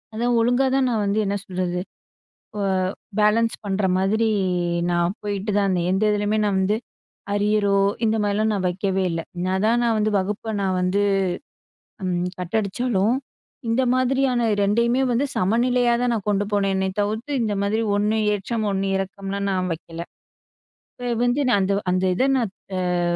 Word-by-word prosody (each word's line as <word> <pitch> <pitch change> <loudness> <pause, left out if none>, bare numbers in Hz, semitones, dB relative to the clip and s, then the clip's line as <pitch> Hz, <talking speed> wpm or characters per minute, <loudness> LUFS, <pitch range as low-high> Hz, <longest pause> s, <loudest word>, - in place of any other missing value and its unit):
அதான் 240 +2 +1
ஒழுங்கா 245 +3 +3
தான் 265 -1 +2
நான் 225 -3 0
வந்து 200 +1 +1
என்ன 200 +1 -1
சொல்றது, 180 -1 -2 0.8
ஆ - - -1 0.6
பேலன்ஸ் 220 +2 +3
பண்ற 200 0 -1
மாதிரி 215 +4 +1 0.6
நான் 175 +2 +1
போயிட்டு 205 0 -3
தான் 205 - +3
இருந்தேன், 175 -2 0
எந்த 190 +3 +1
இதுலயுமே 210 +1 +1
நான் 205 -2 +1
வந்து 190 +3 +2 0.6
அரியரோ, 205 0 +2 0.3
இந்த 220 0 +2
மாரிலாம் 210 +2 +1
நான் 195 -3 -1
வைக்கவே 190 +1 -1
இல்லை, 165 0 -3 0.2
நான் 190 +1 0
தான் 235 +2 +3
நான் 230 -1 +2
வந்து 215 0 +1
வகுப்பை 210 +3 -2
நான் 190 -1 0
வந்து, 180 +3 +1 1.0
ம், 180 -1 0
கட் 180 +4 -3
அடிச்சாலும் 215 +1 0 0.5
இந்த 230 +3 +2
மாதிரியான 255 -2 +1
ரெண்டையுமே 235 +5 +2
வந்து 250 +5 +1
சமநிலையா 240 +5 +2
தான் 245 -1 +1
நான் 210 -3 -4
கொண்டு 205 0 +1
போனேன்னே 195 -1 +1
தவிர்த்து, 220 +7 -2
இந்த 215 -2 0
மாரி 215 +3 0
ஒண்ணு 210 +2 +1 0.2
ஏற்றம், 215 +2 -2
ஒண்ணு 195 0 -1
இறக்கம்லாம் 195 +1 -3
நான் 185 -1 -1
வைக்கல, 165 +1 -10 0.9
இப்போ 245 0 -5 0.2
வந்து 245 +4 +1
நான் 205 - +3
அந்த 195 +1 +1 0.2
அந்த 185 +1 +1
இதை 260 +7 +2
நான் 230 -7 -1 0.5
ஆ - - +1
205 Hz, 160 wpm, -23 LUFS, 190-230 Hz, 1.0 s, ஒழுங்கா